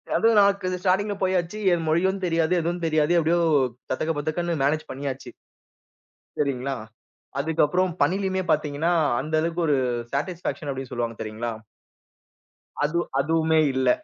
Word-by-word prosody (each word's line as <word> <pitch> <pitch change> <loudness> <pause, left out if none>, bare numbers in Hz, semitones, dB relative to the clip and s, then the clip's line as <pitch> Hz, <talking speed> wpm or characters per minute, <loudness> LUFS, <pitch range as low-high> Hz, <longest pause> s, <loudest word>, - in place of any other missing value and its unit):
அதுவும் 225 -1 +4
நமக்கு 200 -2 +2
ஸ்டார்ட்டிங்குள 200 +2 +1
போயாச்சு. 185 +2 0 0.3
மொழியும் 190 +5 +1
தெரியாது, 165 0 +1
எதுவும் 170 +1 -2
தெரியாது. 155 0 +2
எப்படியோ 170 +2 +2 0.5
தத்தக்க 155 +5 0
பத்தக்கன்னு 160 +1 -2
மேனேஜ் 155 +3 0
பண்ணியாச்சு. 135 0 -5 1.1
சரிங்களா. 135 -2 -1 0.6
அதுக்கப்புறம் 160 +4 +1
பணிலையுமே 190 0 +1
பாத்தீங்கன்னா, 155 +3 +1 0.3
அந்த 155 +1 -2
அளவுக்கு 170 +1 -1
ஒரு 145 -2 +3 0.4
சாட்டிஸ்பேக்ஷன் 165 0 -3
அப்டின்னு 135 -1 -6
சொல்லுவாங்க 120 -2 -3
தெரியுங்களா? 110 +2 -4 1.3
அதுவ் 170 +3 0
அதுவுமே 160 +2 +2 0.2
இல்ல. 130 0 +2
160 Hz, 115 wpm, -24 LUFS, 145-180 Hz, 1.3 s, அதுவும்